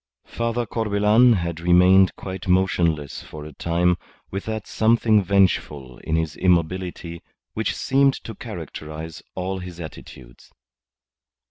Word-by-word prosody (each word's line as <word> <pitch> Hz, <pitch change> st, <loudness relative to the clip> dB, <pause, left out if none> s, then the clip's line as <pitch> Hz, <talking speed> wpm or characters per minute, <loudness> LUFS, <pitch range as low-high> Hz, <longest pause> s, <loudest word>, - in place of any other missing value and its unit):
Father 115 Hz, +1 st, -2 dB
Corbelan 110 Hz, +2 st, +3 dB
had 85 Hz, -4 st, -2 dB
remained 90 Hz, +2 st, +5 dB
quite 95 Hz, 0 st, -7 dB
motionless 85 Hz, -5 st, +1 dB
for 75 Hz, -1 st, -10 dB
a 75 Hz, -, -10 dB
time 85 Hz, +3 st, +1 dB, 0.3 s
with 95 Hz, +1 st, -4 dB
that 110 Hz, -1 st, -4 dB
something 110 Hz, -2 st, +3 dB
vengeful 85 Hz, -9 st, 0 dB
in 80 Hz, -, -2 dB
his 80 Hz, -2 st, -1 dB
immobility 90 Hz, -1 st, -1 dB, 0.3 s
which -, -, -2 dB
seemed 135 Hz, 0 st, +2 dB
to -, -, -8 dB
characterize 80 Hz, 0 st, -8 dB
all 95 Hz, +1 st, -3 dB
his 90 Hz, -1 st, -9 dB
attitudes. 65 Hz, -6 st, -11 dB
90 Hz, 120 wpm, -23 LUFS, 80-100 Hz, 0.3 s, remained